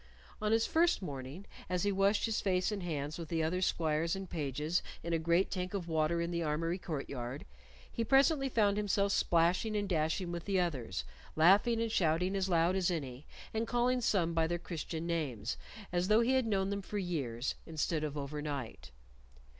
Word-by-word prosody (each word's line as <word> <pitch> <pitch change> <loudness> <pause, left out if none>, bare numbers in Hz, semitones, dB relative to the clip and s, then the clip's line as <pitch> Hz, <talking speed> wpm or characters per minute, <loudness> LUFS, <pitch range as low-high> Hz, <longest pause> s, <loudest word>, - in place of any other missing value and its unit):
On 210 0 +1
his 225 0 +3
first 335 - +2
morning, 140 +4 -6 0.2
as 180 -1 0
he 205 - +2
washed 195 +2 +2
his 225 -2 -1
face 185 0 +1
and 205 -2 -3
hands 155 -2 -3
with 165 - -6
the 165 -2 0
other 180 +4 0
squires 165 0 +1
and 195 0 -5
pages 150 +1 -1 0.2
in 170 - -2
a 165 - +2
great 170 +4 +2
tank 185 +1 -3
of 180 -4 -3
water 160 +1 +1
in 170 +1 -1
the 170 0 -1
armory 165 +3 -1
court 155 -7 -4
yard, 125 +1 -5 0.5
he 230 - -1
presently 275 +2 +4
found 210 -4 +2
himself 200 -1 +1
splashing 175 +5 +2
and 205 -1 -1
dashing 170 +1 0
with 170 -1 -5
the 195 -2 +1
others, 130 - -2 0.3
laughing 200 +8 +5
and 230 -1 -1
shouting 180 +1 +1
as 195 -1 0
loud 170 +1 +3
as 190 -2 +2
any, 140 -5 -4 0.3
and 225 +1 -1
calling 245 +1 +1
some 175 -7 +1
by 165 -1 +2
their 175 +1 -1
Christian 165 -1 -5
names 140 -10 -2 0.4
as 175 +1 +1
though 215 +2 +5
he 235 +2 +2
had 260 -3 +2
known 195 -2 +1
them 200 0 -2
for 205 +2 -5
years 140 - -2
instead 160 0 -1
of 150 -1 -3
overnight. 140 - -5
175 Hz, 195 wpm, -33 LUFS, 155-200 Hz, 0.5 s, laughing